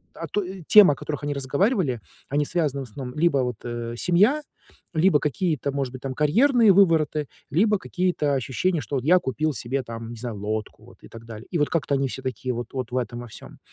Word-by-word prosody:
а, - - -6
то 205 - -1
и 185 0 -8
темы, 205 -8 +8
о - - -7
которых 145 +1 -5
они 145 0 -1
разговаривали, 140 - 0 0.3
они 145 +2 +1
связаны 150 -4 -1
в - - -14
основном 125 +4 -8
либо 165 -2 +3
вот, 125 -3 -1
э, 120 -1 -5
семья, 205 - +3 0.5
либо 160 -1 +4
какие-то, 150 -1 -1
может 135 -2 -3
быть, 130 - -8
там 135 -1 -4
карьерные 225 - +4
вывороты, 160 -6 +3 0.2
либо 210 +7 +3
какие-то 180 -7 -1
ощущения, 140 +7 -1
что 140 +3 -3
вот 130 - -4
я 180 +4 +6
купил 155 +1 -1
себе 130 +2 -2
там, 115 -1 -7
не 120 - -8
знаю, 115 -2 -5
лодку, 105 +1 -4
вот, - - -17
и - - -11
так 115 0 -12
далее. 110 0 -10
И 175 - 0
вот 145 - +2
как-то 145 -4 -1
они 135 0 0
все 130 - -5
такие 130 0 -3
вот 120 0 -6
вот 130 -3 -4
в 125 - -1
этом 120 -1 -3
во 120 - -9
всем. - - -12
140 Hz, 225 wpm, -24 LUFS, 125-170 Hz, 0.5 s, темы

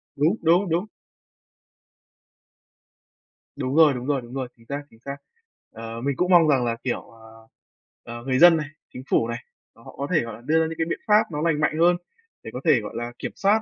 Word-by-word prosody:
Đúng, 155 +8 +2
đúng, 170 +3 +3
đúng. 170 +5 0 2.7
Đúng 130 +2 -3
rồi, 155 -3 +6
đúng 125 -1 -5
rồi, 140 -3 +1
đúng 120 +1 -12
rồi, 130 -1 -3
chính 115 - -21
xác, 140 +3 -5
chính 115 - -21
xác. 140 +3 -7 0.5
Ờ, 115 +1 -7
mình 140 +1 -1
cũng 180 +1 +1
mong 170 -3 +7
rằng 135 -5 +3
là, 115 -1 -1
kiểu, 125 - -2
ờ, 110 0 -17 0.6
ờ, 120 0 -8
người 130 0 0
dân 175 0 +8
này, 150 -2 -3 0.3
chính 125 - -8
phủ 115 - +2
này, 115 0 -3 0.4
là 115 - -19
họ - - -13
có 140 - -3
thể, 160 -4 +3
gọi 115 -1 -6
là, 115 - -14
đưa 155 +6 +2
ra - - +2
những 165 - -6
cái 165 - 0
biện - - -2
pháp 210 0 +6
nó 150 -1 -3
lành 160 -2 +1
mạnh 150 0 +1
hơn 175 +1 +5 0.5
để - - -8
có 125 - -4
thể, 125 - +4
gọi 105 - -8
là, 120 0 -4
kiểm - - -4
soát, 205 +3 +2
140 Hz, 225 wpm, -24 LUFS, 120-165 Hz, 2.7 s, dân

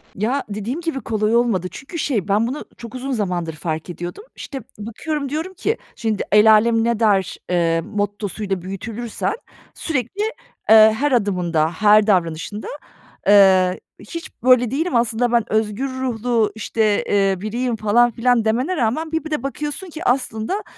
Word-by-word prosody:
Ya, 245 +8 -1
dediğim 215 +10 -4
gibi 325 -5 -3
kolay 215 0 0
olmadı. 225 -7 +1
Çünkü, 315 +5 -8
şey, 220 - -1
ben, 210 +3 +2
bunu 270 +5 -5
çok 235 0 -9
uzun 265 +2 -4
zamandır 180 -8 -2
fark 155 +1 -4
ediyordum. 175 - -6
İşte, 270 -3 -7 0.2
bakıyorum, 280 +7 -4
diyorum 320 +6 -4
ki: 435 +5 -1 0.2
"Şimdi 220 -3 -1
el 210 +1 +7
âlem 225 +1 +4
ne 235 -1 0
der?" 200 -4 +2
eee, 165 -2 +1
mottosuyla 205 -1 -3
büyütülürsen 220 - -4 0.4
sürekli, 300 - -3 0.5
eee, 220 0 +8
her 290 0 +1
adımında, 180 -8 +1
her 210 +4 +4
davranışında. 180 +1 0 0.6
Eee, 190 -2 +5 0.2
hiç 335 +11 -8
böyle 250 -2 +4
değilim 310 +2 -1
aslında 235 0 +1
ben 235 -1 +3
özgür 220 +4 0
ruhlu, 240 -4 0
işte, 215 -1 0
eee, 195 -1 +2
biriyim 235 +3 -2
falan 225 +3 +3
filan 240 0 +1
demene 250 +11 0
rağmen 295 +7 -1
bir 320 -2 -1
bir 315 - -8
de 300 - -2
bakıyorsun 295 +6 -5
ki 320 +1 -8
aslında, 245 - -1
225 Hz, 155 wpm, -20 LUFS, 205-260 Hz, 0.6 s, eee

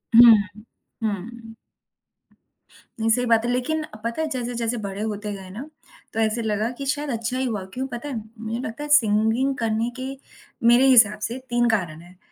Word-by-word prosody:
हुँ, 235 0 +10
हुँ। 210 +2 -16 0.4
हुँ। 225 +2 -5 1.4
नहीं, 225 0 +1
सही 250 +2 +2
बात 230 -1 +3
है। 240 - 0
लेकिन 280 +6 -1
अ, 215 -8 -11
पता 230 +6 -2
है 320 - 0
जैसे-जैसे 240 -3 -2
बड़े 200 +1 -5
होते 210 -1 -3
गए 190 -2 -9
ना 240 +11 -8 0.4
तो 225 - -2
ऐसे 220 +1 +1
लगा 215 0 -1
कि 275 - -5
शायद 290 +2 -2
अच्छा 230 0 -2
ही 260 - 0
हुआ, 215 -6 -2
क्यों 260 +1 -3
पता 245 +3 -6
है? 270 - -4 0.2
मुझे 225 +1 -4
लगता 245 +3 -5
है 295 - -6
सिंगिंग 230 0 +3
करने 225 0 0
के 260 - -4 0.6
मेरे 240 +3 +6
हिसाब 220 -5 +6
से 235 - -5
3 240 0 +2
कारण 175 -8 -1
हैं, 175 +1 -17
230 Hz, 190 wpm, -23 LUFS, 215-250 Hz, 1.4 s, हुँ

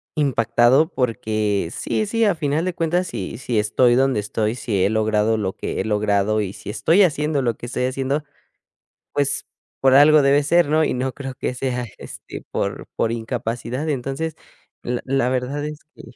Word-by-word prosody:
impactado, 130 0 +3
porque 110 -6 -1
sí, 215 - -2
sí, 230 +2 0
a 205 - +3
final 155 +1 -1
de 185 - -1
cuentas 175 +3 0
si 100 +4 -5
si 120 -3 -1
estoy 120 +3 +3
donde 135 -3 +2
estoy, 105 +2 -1
si 100 -7 -1
he 100 - +3
logrado, 110 0 +1
lo 95 -3 -2
que - - -4
he - - -4
logrado 105 0 +1
y 95 -1 -4
si - - -10
estoy 160 - +3
haciendo 150 -4 +1
lo 120 -3 0
que - - -9
estoy 125 +1 -1
haciendo, 135 +3 -1 0.9
pues, 140 -1 0 0.4
por 135 -1 +5
algo 150 +1 +7
debe 140 +1 +4
ser, 170 0 +3
¿no? 155 +1 +3
Y - - 0
no 130 +1 -1
creo 135 0 -6
que - - -3
sea 125 -1 -2
este, - - -9
por - - -3
por 115 - 0
incapacidad. 120 +4 -3
Entonces 140 +4 -3 0.5
la 120 0 -2
la 135 -2 +1
verdad 130 +3 -2
es 150 0 -6 0.2
que - - -12
125 Hz, 180 wpm, -21 LUFS, 110-145 Hz, 0.9 s, algo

